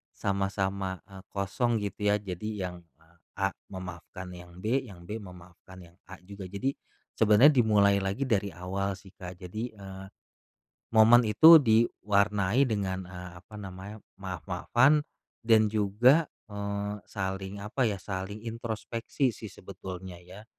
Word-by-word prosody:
sama-sama, 95 -1 -1
eee, 95 -1 -11
kosong 100 +5 0
gitu, 105 +1 -2
ya. - - +4
Jadi 105 +2 -5
yang, 90 -1 -5 0.2
eee, 80 +1 -27 0.2
A 95 0 0 0.2
memaafkan 90 0 -8
yang 90 0 -12
B, 120 +7 +1
yang 95 -9 -12
B 110 +3 -5
memaafkan 90 0 -13
yang 85 - -19 0.2
A 95 - -9
juga. 100 -1 -9
Jadi, 130 +8 -2 0.4
sebenarnya 110 +7 +6
dimulai 105 -5 +4
lagi 100 +8 -1
dari 105 -5 +1
awal 95 +3 -3
sih 95 0 -16
Kak, 90 -1 -9
jadi, 90 +5 -6
eee, 95 -1 -9 0.9
momen 115 +2 +7
itu 160 +10 +9
diwarnai 105 0 +2
dengan, 95 -4 -2
eee, 90 -1 -8
apa 105 +3 -13
namanya, 95 +1 -8 0.2
maaf-maafan 95 +10 +2 0.4
dan 110 -2 +4
juga, 115 +9 +4 0.2
eee, 100 0 -3
saling 95 0 -4
apa 120 +3 0
ya, 100 - -2
saling 100 +3 -6
introspeksi 115 +3 -2
sih 110 - -9
sebetulnya 95 -1 -9
ya 95 +4 -13
100 Hz, 135 wpm, -29 LUFS, 95-110 Hz, 0.9 s, itu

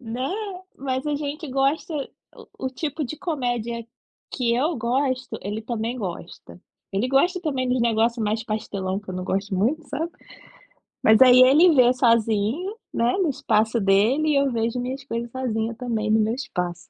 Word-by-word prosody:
Né, 250 +6 -4 0.4
mas 260 -1 -3
a 295 - 0
gente 295 +2 -4
gosta 275 +5 0
o 285 -2 -3 0.5
o 260 - -2
tipo 295 +3 -4
de 290 +4 -6
comédia 245 -8 -3 0.5
que 235 -3 0
eu 300 +7 0
gosto, 255 +2 -1
ele 210 +3 -4
também 230 +1 -3
gosta. 180 -4 -7 0.3
Ele 200 +6 0
gosta 350 +8 +2
também 275 -7 -1
dos 250 0 +1
negócio 230 0 +1
mais 215 +2 -1
pastelão, 200 -3 -3
que 205 - -26
eu 185 - -4
não 185 0 -4
gosto 195 +2 -2
muito, 245 +13 +1
sabe. 325 +5 -3 0.9
Mas 220 +2 +6
aí 255 -1 +8
ele 305 +6 +6
vê 250 -2 +6
sozinho, 230 - +1 0.2
né, 235 +1 +1
no 350 - +2
espaço 225 -3 +1
dele, 215 +10 +3
e 300 - +2
eu 275 -1 +2
vejo 230 +1 -1
minhas 255 +2 -4
coisas 235 -2 -4
sozinha 230 -3 -2
também 225 -3 -2
no 220 +1 +4
meu 220 +1 +1
espaço. 180 -9 -4
245 Hz, 170 wpm, -23 LUFS, 220-275 Hz, 0.9 s, aí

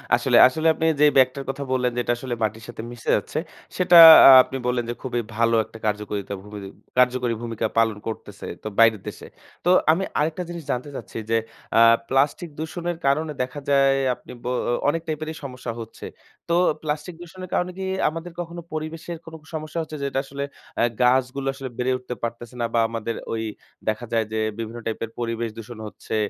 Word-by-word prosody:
আসলে, - - +2
আসলে 160 +5 -1
আপনি 160 - -2 0.2
যে, - - +8
ব্যাগটার 130 +1 +3
কথা 140 +1 -3
বললেন 125 -1 +1
যেটা 120 0 0
আসলে 120 -1 -4
মাটির 110 +1 -2
সাথে 120 -2 -7
মিশে 120 -2 -7
যাচ্ছে। 125 +9 -2 0.4
সেটা 180 -1 +6 0.3
আ - - +11
আপনি 135 - -6
বললেন 125 -1 0
যে, - - -1
খুবই 120 -2 -2 0.2
ভালো 115 0 +3
একটা 115 - -13
কার্যকরিতা 105 -1 -2
ভূমি 105 0 -10 0.4
কার্যকরী 125 -1 +3
ভূমিকা 115 -1 -3
পালন 110 -2 +3
করতেছে। 105 -2 -7 0.2
তো - - -4
বাইরের 115 -3 +5
দেশে। - - -8 0.4
তো - - +3 0.2
আমি 185 +4 +1 0.2
আরেকটা 160 +4 -1
জিনিস 170 -2 -6
জানতে 125 +4 -3
চাচ্ছি - - -8
যে, 115 - +4 0.4
আ - - +7 0.3
প্লাস্টিক 145 +5 +1
দূষণের 170 +2 -4
কারণে 155 +3 +1
দেখা 130 +3 -6
যায় 135 -1 +4 0.2
আপনি - - -14
বো 125 - -2 0.4
অনেক 165 +2 -1
টাইপেরই 155 0 -4
সমস্যা 125 -3 -6
হচ্ছে। 115 -1 -9 0.4
তো 170 - +3 0.3
প্লাস্টিক 155 +2 -4
দূষণের 185 +1 -9
কারণে 180 +1 0
কি 190 - -4 0.2
আমাদের 165 +2 -7
কখনো 170 0 -7
পরিবেশের 160 +2 -5
কোন 165 - -11 0.2
সমস্যা 155 +1 -5
হচ্ছে, 155 -1 -7
যেটা 135 -1 -1
আসলে 140 +1 -5 0.4
আ - - +4 0.2
গাছগুলো 130 +2 +2
আসলে 135 -1 -7
বেড়ে 125 +1 0
উঠতে 125 -1 -7
পারতেছে 120 +1 -5
না - - +1
বা 115 - +3
আমাদের 115 0 -4 0.2
ওই 110 0 -2 0.5
দেখা 110 +3 -2
যায় 115 -1 +2
যে, 110 - -2 0.2
বিভিন্ন 115 +1 -5
টাইপের 115 0 -3
পরিবেশ 115 0 -2
দূষণ 115 +1 -9
হচ্ছে? 105 - -6
130 Hz, 185 wpm, -23 LUFS, 115-155 Hz, 0.5 s, আ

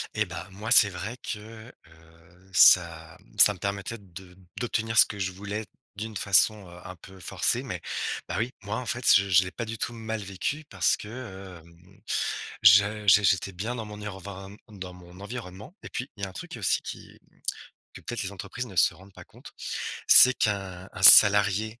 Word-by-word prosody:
Et - - 0
bah, 90 - -9
moi, 105 +4 -8
c'est 100 - +8
vrai 100 +6 -7
que, 120 - -7 0.5
heu, 80 +3 -23
ça 80 -3 +3
m - - -25
ça 105 - +7
me 95 - -16
permettait 100 +3 -5
de 90 -1 -15 0.2
d'obtenir 115 -2 -3
ce - - +8
que 105 - -10
je 95 -1 -3
voulais 105 +3 -7 0.3
d'une 110 0 -6
façon, 100 +1 +2
heu, 85 0 -14
un 90 -1 -9
peu 95 +2 -16
forcée - - -1
mais, - - -7 0.5
bah 85 - -5
oui, 115 +3 -3
moi, 105 +2 -5
en 125 - -6
fait, 120 0 -4
je 100 0 +2
je 90 0 +4
l'ai 90 - -8
pas 115 - -6
du 115 0 -7
tout 120 - -5
mal 110 -1 -6
vécu, 100 +11 -5
parce 95 -3 0
que, 100 -6 -11
hem, 90 +4 -23 0.6
je 105 +2 +4
j'é 100 +2 +5
j'étais 95 0 0
bien 105 +7 -6
dans 115 -2 -7
mon 105 0 -11
ireven 100 0 -10
m 105 -2 -15
dans 90 -1 -8
mon 90 0 -16
environnement. 105 - -10
Et - - -10
puis 125 - -6
il 100 - -10
y - - 0
a - - -9
un - - -16
truc, - - -9
aussi, - - 0
qui - - -11 0.7
que, - - -13
peut-être, 120 -2 -6
les 95 - -6
entreprises 100 +5 -8
ne 100 - -13
se - - +3
rendent 95 +1 -19
pas - - -14
compte. - - -16 0.6
C'est 130 0 +8
qu'un, 95 -4 -4
un - - -10
salarié, 105 +3 +6
100 Hz, 205 wpm, -25 LUFS, 95-110 Hz, 0.7 s, c'est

